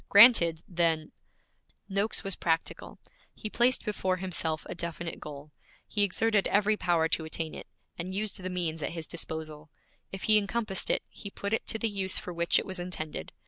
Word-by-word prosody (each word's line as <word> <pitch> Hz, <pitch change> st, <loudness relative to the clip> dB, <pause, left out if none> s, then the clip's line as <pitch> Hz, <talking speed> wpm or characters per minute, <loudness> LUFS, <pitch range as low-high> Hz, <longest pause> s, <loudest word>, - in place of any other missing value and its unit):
Granted 195 Hz, -7 st, +7 dB
then 165 Hz, -3 st, +1 dB, 0.4 s
' -, -, -42 dB
Noakes 210 Hz, +3 st, +1 dB
was 195 Hz, -2 st, -1 dB
practical. 165 Hz, -1 st, -2 dB, 0.4 s
He 215 Hz, -, -5 dB
placed 245 Hz, +2 st, +2 dB
before 190 Hz, -3 st, 0 dB
himself 170 Hz, -4 st, -1 dB
a -, -, -5 dB
definite 170 Hz, 0 st, -4 dB
goal. 150 Hz, 0 st, -9 dB, 0.4 s
He 210 Hz, -, 0 dB
exerted 205 Hz, +1 st, +2 dB
every 210 Hz, +1 st, +3 dB
power 170 Hz, -5 st, +2 dB
to 170 Hz, -3 st, +1 dB
attain 160 Hz, 0 st, -4 dB
it, -, -, -8 dB, 0.3 s
and 180 Hz, +2 st, -3 dB
used 205 Hz, -1 st, -2 dB
the 185 Hz, -, -3 dB
means 170 Hz, -3 st, -2 dB
at 150 Hz, -, -2 dB
his 165 Hz, -2 st, -4 dB
disposal. 155 Hz, -2 st, -5 dB, 0.4 s
If 195 Hz, -, -6 dB
he 215 Hz, -1 st, +6 dB
encompassed 210 Hz, -1 st, -1 dB
it, -, -, +2 dB
he 200 Hz, -, -9 dB
put 200 Hz, +1 st, -4 dB
it 225 Hz, -, 0 dB
to -, -, -1 dB
the 225 Hz, -, 0 dB
use 195 Hz, -3 st, 0 dB
for 180 Hz, -, -4 dB
which 170 Hz, 0 st, +3 dB
it -, -, 0 dB
was 190 Hz, -1 st, -3 dB
intended. 155 Hz, -, -5 dB
180 Hz, 185 wpm, -29 LUFS, 165-205 Hz, 0.4 s, Granted